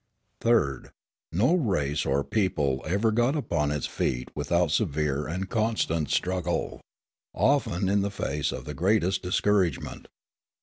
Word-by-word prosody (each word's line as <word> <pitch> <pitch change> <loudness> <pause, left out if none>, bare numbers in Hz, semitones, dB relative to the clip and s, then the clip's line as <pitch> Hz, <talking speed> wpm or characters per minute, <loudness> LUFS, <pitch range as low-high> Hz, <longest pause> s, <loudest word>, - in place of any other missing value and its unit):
Third. 95 - +1 0.4
No 105 - +3
race 80 - 0
or 70 +1 +1
people 75 -9 0
ever 100 +6 +2
got 120 +6 +2
upon 80 - 0
its 75 -1 -2
feet 60 0 -3
without 80 +3 +1
severe 75 -5 0
and 90 +4 -3
constant 105 - 0
struggle, 90 -1 -1 0.5
often 125 -9 +2
in 100 +1 +2
the 100 - -1
face 75 -6 -2
of - - -6
the 75 - -5
greatest 95 +3 +1
discouragement. 95 -3 0
90 Hz, 130 wpm, -27 LUFS, 75-105 Hz, 0.5 s, No